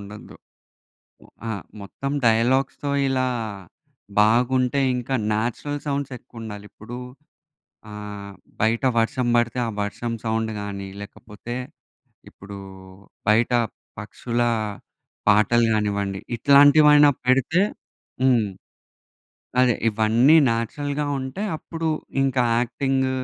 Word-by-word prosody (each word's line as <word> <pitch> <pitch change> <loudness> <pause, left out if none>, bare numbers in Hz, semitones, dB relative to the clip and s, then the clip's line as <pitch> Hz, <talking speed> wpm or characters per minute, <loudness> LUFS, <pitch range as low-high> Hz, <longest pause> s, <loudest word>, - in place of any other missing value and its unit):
ఉండొద్దు. 100 +1 -11 0.9
ఒ - - -18 0.2
ఆ! - - -2 0.3
మొత్తం 135 +7 -5 0.2
డైలాగ్స్‌తో 130 +5 +1 0.2
ఇలా 130 -1 +1 0.9
బాగుంటే 125 +5 +3 0.2
ఇంకా 125 +2 -2 0.2
న్యాచురల్ 120 +7 -2
సౌండ్స్ 140 -1 -2
ఎక్కువుండాలి. 110 -4 -9
ఇప్పుడు 120 +3 -9 0.9
ఆహ్, 105 -1 -8 0.3
బయట 110 +2 +2 0.2
వర్షం 120 +2 0
బడితే 120 +1 +1
ఆ - - -2
వర్షం 115 +3 -3
సౌండ్ 110 0 -1
గాని 100 -1 -6
లేకపోతే 105 +3 -9 0.8
ఇప్పుడు 100 +1 -11 0.7
బయట 110 +3 +3 0.5
పక్షుల 115 +3 -3 0.9
పాటలు 110 +3 +4
గానివ్వండి 100 -2 -1 0.2
ఇట్లాంటివైనా 145 +2 +7 0.2
పెడితే 135 +7 +3 0.6
హ్మ్. 120 -5 +3 1.1
అదే 125 -2 +4
ఇవన్నీ 115 +7 +4
న్యాచురల్‌గా 145 +6 -2
ఉంటే 130 +8 -5 0.2
అప్పుడు 165 +1 -5 0.4
ఇంకా 130 -2 +1 0.2
యాక్టింగ్, 130 +2 0
120 Hz, 95 wpm, -23 LUFS, 105-135 Hz, 1.1 s, ఇట్లాంటివైనా